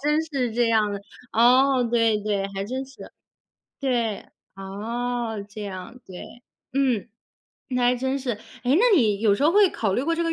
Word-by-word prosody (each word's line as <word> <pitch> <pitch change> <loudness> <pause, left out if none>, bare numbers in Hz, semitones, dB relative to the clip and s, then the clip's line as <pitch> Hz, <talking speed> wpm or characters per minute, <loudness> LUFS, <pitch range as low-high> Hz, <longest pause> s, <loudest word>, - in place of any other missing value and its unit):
真 300 +2 +2
是 270 -7 -2
这 235 +1 +2
样 215 -2 +2
的。 200 - -5 0.3
哦， 255 +2 +4
对， 230 -2 +3
对， 205 -2 -1
还 195 - -2
真 260 +5 -4
是。 270 - -13 0.7
对， 240 -6 -1 0.3
哦， 225 +3 -4
这 210 +1 -8
样， 200 +5 -8
对， 220 +6 -11 0.3
嗯， 250 -5 +1 0.6
那 250 -2 -1
还 245 +1 +4
真 265 +2 -1
是。 260 -2 -3 0.3
诶， 255 +3 +3
那 440 0 +5
你 210 -6 +2
有 210 -3 +4
时 270 - -3
候 315 - +4
会 410 0 +6
考 210 -4 -1
虑 245 - 0
过 330 +4 0
这 335 - -1
个 330 - 0
240 Hz, 190 characters per minute, -24 LUFS, 210-270 Hz, 0.7 s, 会